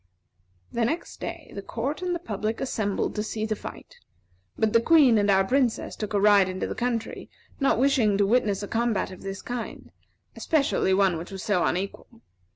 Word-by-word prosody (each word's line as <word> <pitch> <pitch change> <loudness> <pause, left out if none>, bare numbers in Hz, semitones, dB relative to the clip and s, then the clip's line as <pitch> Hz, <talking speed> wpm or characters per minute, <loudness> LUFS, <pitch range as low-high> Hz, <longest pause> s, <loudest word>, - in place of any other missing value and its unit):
The 235 - 0
next 320 +9 -3
day, 335 -2 -7
the 200 - -5
court 260 - -4
and 360 -1 -1
the - - 0
public 220 - -3
assembled 215 -6 -1
to 210 - -2
see 215 0 -3
the 215 0 -1
fight; - - -10 0.6
but 220 -1 +1
the 230 - +5
Queen 270 -6 +5
and 205 0 +1
our 195 -1 +5
Princess 250 +2 0
took 210 -1 -4
a - - +3
ride 200 -2 +5
into 185 0 -3
the - - -3
country, 235 -1 -3 0.3
not 275 -5 +2
wishing 245 -6 +3
to 200 - +3
witness 210 -2 +1
a - - -4
combat 225 -4 0
of 185 - -11
this 195 0 -6
kind, 245 -1 -6 0.4
especially 275 -11 +1
one 190 -4 +2
which 170 - -8
was 190 -2 -7
so 205 -5 +1
unequal. 200 +5 -3
220 Hz, 190 wpm, -26 LUFS, 200-250 Hz, 0.6 s, the